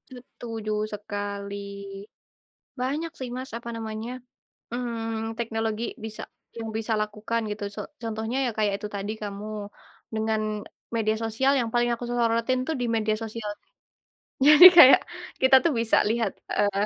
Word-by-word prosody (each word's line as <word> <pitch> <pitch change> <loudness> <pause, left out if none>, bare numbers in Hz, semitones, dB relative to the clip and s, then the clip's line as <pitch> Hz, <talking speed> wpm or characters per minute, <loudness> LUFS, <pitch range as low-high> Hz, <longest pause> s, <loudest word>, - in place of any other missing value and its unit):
Setuju 225 -3 -7 0.2
sekali. 205 -1 -5 1.2
Banyak 295 +6 -2
sih 260 -2 -4
Mas, 260 +1 -6
apa 235 0 -6
namanya, 225 +1 -5 0.6
mmm, 225 -2 -3
teknologi 225 -1 -2 0.2
bisa 220 -1 -6 0.3
yang 225 -1 -5
bisa 225 0 -2
lakukan 215 +2 -2
gitu. 210 0 -7
Co - - -6 0.2
contohnya 225 +2 -3
ya - - 0
kayak 210 -2 +2
itu 210 - -4
tadi 200 +2 -3
kamu 200 0 -5 0.7
dengan 220 0 0 0.6
media 220 -1 +1
sosial 230 +5 +1
yang 235 - -1
paling 240 0 +2
aku 235 +1 -4
sorotin 235 +1 +1
tuh - - -1
di 245 - 0
media 215 -1 +1
sosial. 220 -1 -5 1.0
Jadi 300 +4 +10
kayak 270 -5 +10 0.4
kita 260 0 +6
tuh 335 - +4
bisa 230 -1 +2
lihat, 225 -3 0 0.2
eee, 205 -1 +1
225 Hz, 140 wpm, -26 LUFS, 215-240 Hz, 1.2 s, Jadi